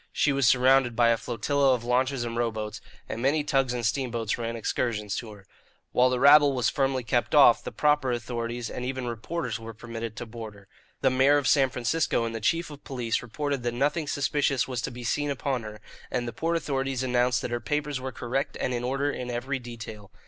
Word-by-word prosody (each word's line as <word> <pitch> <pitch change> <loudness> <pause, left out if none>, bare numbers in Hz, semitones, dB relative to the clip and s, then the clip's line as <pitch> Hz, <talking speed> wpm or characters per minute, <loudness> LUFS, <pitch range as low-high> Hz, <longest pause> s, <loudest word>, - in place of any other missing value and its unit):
She 145 - +2
was 135 -3 +2
surrounded 130 -1 +4
by 120 0 +4
a 115 - +4
flotilla 130 +4 +1
of 120 - -6
launches 125 +1 +1
and 115 -1 -4
rowboats, 110 -3 -2 0.3
and 115 - -5
many 145 +4 +2
tugs 135 -3 +1
and 120 -2 -2
steamboats 115 -3 -1
ran 115 -1 -4
excursions 105 -2 -2
to 115 - -5
her. 100 -2 -14 0.5
While 125 +1 +4
the 125 -1 0
rabble 145 0 +7
was 125 -3 +1
firmly 135 -2 0
kept 115 - 0
off, - - +7
the - - -5
proper 150 -3 +2
authorities 120 0 -3
and 125 - -5
even 130 0 -3
reporters 120 +1 -3
were 115 0 -9
permitted 115 -1 -6
to 120 - -6
board 110 -2 -8
her. 100 -1 -17 0.3
The 130 - +3
mayor 135 +3 +4
of 145 - 0
San 135 -3 +4
Francisco 125 0 0
and 115 - -4
the 115 - -5
chief 165 +8 0
of 145 - -11
police 120 -4 -2
reported 140 +3 -3
that 120 0 -2
nothing 145 +4 0
suspicious 140 -1 +1
was 125 -3 -3
to - - -3
be 120 0 -8
seen 145 +5 0
upon 135 -2 -1
her, 105 -1 -9 0.3
and 120 -1 -2
the 120 - -5
port 165 +7 0
authorities 135 -4 -2
announced 125 0 +1
that - - -3
her 120 - -1
papers 145 +4 -2
were 130 0 -4
correct 125 +2 -3
and 125 - -1
in 120 0 -2
order 135 +3 0
in 125 -3 -5
every 130 +3 -2
detail. 110 -4 -9
125 Hz, 215 wpm, -27 LUFS, 115-135 Hz, 0.5 s, rabble